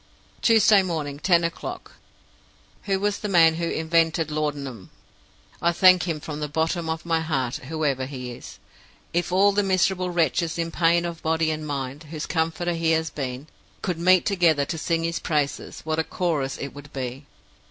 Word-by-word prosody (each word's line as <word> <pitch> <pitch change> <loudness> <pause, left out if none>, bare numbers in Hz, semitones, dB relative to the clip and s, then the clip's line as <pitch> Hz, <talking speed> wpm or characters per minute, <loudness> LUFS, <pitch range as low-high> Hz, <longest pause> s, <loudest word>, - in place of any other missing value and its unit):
"Tuesday 220 -3 +6
morning, 155 -6 -3
ten 170 0 +3
o'clock. 170 0 -5 0.9
Who 195 -1 0
was 205 0 0
the 210 - -4
man 165 -4 +6
who 170 0 -1
invented 160 -1 +1
laudanum? 145 -9 -3 0.7
I 170 - +3
thank 185 +1 +5
him 160 -3 -2
from 150 0 -6
the 150 - -2
bottom 160 +3 -1
of 160 0 -3
my 165 -1 +1
heart 135 -6 -1
whoever 140 -2 -2
he 125 -3 -6
was. - - -11 0.6
If 175 +1 0
all 195 +2 +5
the 205 +1 +2
miserable 185 -1 +1
wretches 170 0 0
in 165 0 -2
pain 170 +1 +2
of 170 -1 -5
body 160 0 +1
and 155 0 -4
mind, 140 +1 -4
whose 155 -1 -5
comforter 165 +1 -1
he 165 -1 +1
has 160 -1 0
been, 130 -1 -5 0.4
could 175 -3 -2
meet 185 +1 +4
together 170 -7 +3
to 165 - -4
sing 165 0 0
his 165 0 -1
praises, 150 -3 -2
what 160 0 -2
a - - +2
chorus 155 -7 -2
it 140 - -6
would 145 +1 -12
be! 130 +1 -6
160 Hz, 175 wpm, -24 LUFS, 145-175 Hz, 0.9 s, Tuesday